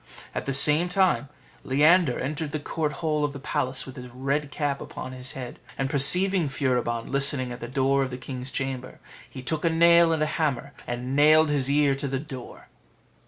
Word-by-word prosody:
At -, -, -5 dB
the 135 Hz, -, 0 dB
same 150 Hz, +5 st, +6 dB
time, 180 Hz, -6 st, +1 dB, 0.3 s
Leander 150 Hz, +1 st, +3 dB
entered 150 Hz, +2 st, -4 dB
the 155 Hz, -, -1 dB
court 150 Hz, +1 st, -2 dB
hall 150 Hz, -1 st, +1 dB
of 145 Hz, -1 st, -1 dB
the 140 Hz, -, -8 dB
palace 130 Hz, 0 st, -3 dB
with 130 Hz, -, -11 dB
his 125 Hz, 0 st, -8 dB
red 135 Hz, +4 st, -2 dB
cap 145 Hz, -2 st, -2 dB
upon 130 Hz, -, -7 dB
his 130 Hz, +1 st, -5 dB
head, 125 Hz, -2 st, -8 dB, 0.2 s
and 135 Hz, 0 st, -2 dB
perceiving 175 Hz, +4 st, +3 dB
Furibon 125 Hz, -4 st, -1 dB
listening 135 Hz, -2 st, +2 dB
at 120 Hz, -, -7 dB
the 120 Hz, -, -6 dB
door 135 Hz, +1 st, +1 dB
of 135 Hz, -, -1 dB
the 125 Hz, -, -6 dB
king's 130 Hz, 0 st, -7 dB
chamber, 130 Hz, -1 st, -5 dB, 0.3 s
he 130 Hz, -, -9 dB
took 155 Hz, +3 st, -2 dB
a 165 Hz, -, +3 dB
nail 170 Hz, 0 st, +5 dB
and 160 Hz, -1 st, +1 dB
a 155 Hz, -, -2 dB
hammer, 140 Hz, -2 st, -1 dB
and 125 Hz, +2 st, -4 dB
nailed 155 Hz, +2 st, +5 dB
his 140 Hz, -2 st, 0 dB
ear 145 Hz, -1 st, +3 dB
to 135 Hz, +1 st, -3 dB
the 135 Hz, 0 st, -2 dB
door. 130 Hz, -4 st, -10 dB
140 Hz, 200 wpm, -25 LUFS, 130-155 Hz, 0.3 s, same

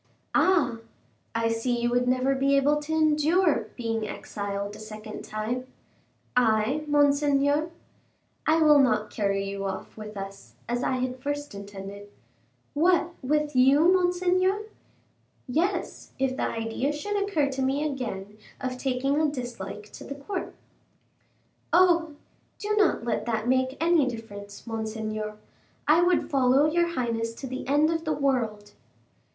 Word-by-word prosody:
"Ah! 325 Hz, -11 st, +3 dB, 0.6 s
I 230 Hz, 0 st, +1 dB
see 235 Hz, +2 st, 0 dB
you 240 Hz, 0 st, 0 dB
would 245 Hz, 0 st, +2 dB
never 255 Hz, +2 st, +2 dB
be 275 Hz, +1 st, +2 dB
able 290 Hz, +2 st, +3 dB
to 295 Hz, +1 st, -5 dB
endure 315 Hz, +2 st, +3 dB
being 225 Hz, -3 st, -2 dB
exiled 200 Hz, 0 st, -5 dB
a -, -, -11 dB
second 215 Hz, 0 st, -8 dB
time." 230 Hz, +4 st, -3 dB, 0.7 s
"I, 245 Hz, +5 st, +2 dB
monseigneur?" 290 Hz, +1 st, +3 dB, 0.8 s
"I 320 Hz, +1 st, +4 dB
will 300 Hz, -1 st, +7 dB
not 215 Hz, -5 st, +2 dB
carry 195 Hz, -2 st, 0 dB
you 195 Hz, 0 st, -4 dB
off 190 Hz, 0 st, -5 dB
with 215 Hz, -1 st, -8 dB
us, 195 Hz, 0 st, -8 dB
as 240 Hz, +1 st, -1 dB
I -, -, 0 dB
had 255 Hz, 0 st, -2 dB
first 290 Hz, -1 st, -3 dB
intended." 200 Hz, 0 st, -9 dB, 0.6 s
"What, 345 Hz, +3 st, +3 dB
with 300 Hz, +2 st, 0 dB
you, 280 Hz, +8 st, +6 dB
monseigneur?" 370 Hz, +2 st, +2 dB, 0.8 s
"Yes; 350 Hz, +8 st, -2 dB
if 265 Hz, -1 st, 0 dB
the -, -, 0 dB
idea 225 Hz, +5 st, -2 dB
should 405 Hz, +8 st, -2 dB
occur 395 Hz, -8 st, +1 dB
to 265 Hz, 0 st, -3 dB
me 275 Hz, +3 st, +1 dB
again 215 Hz, -7 st, -5 dB, 0.2 s
of 255 Hz, -1 st, -4 dB
taking 270 Hz, +3 st, 0 dB
a 310 Hz, -, +3 dB
dislike 240 Hz, -6 st, -6 dB
to -, -, -10 dB
the 280 Hz, -, -6 dB
court." 360 Hz, +7 st, -5 dB, 1.2 s
"Oh! 340 Hz, -3 st, +4 dB, 0.4 s
do 420 Hz, 0 st, -2 dB
not 415 Hz, -, +3 dB
let 235 Hz, 0 st, -2 dB
that 225 Hz, -1 st, -1 dB
make 260 Hz, +1 st, +1 dB
any 330 Hz, -4 st, +3 dB
difference, 205 Hz, -4 st, -8 dB
monseigneur; 215 Hz, -1 st, -4 dB, 0.5 s
I 315 Hz, +3 st, +6 dB
would 350 Hz, 0 st, +2 dB
follow 270 Hz, +1 st, +4 dB
your 340 Hz, +2 st, +2 dB
highness 230 Hz, -7 st, -2 dB
to 270 Hz, -, -7 dB
the 255 Hz, -1 st, -5 dB
end 295 Hz, +3 st, +3 dB
of 325 Hz, 0 st, -1 dB
the 310 Hz, -, +1 dB
world." 230 Hz, -7 st, -1 dB
260 Hz, 145 wpm, -27 LUFS, 225-305 Hz, 1.2 s, will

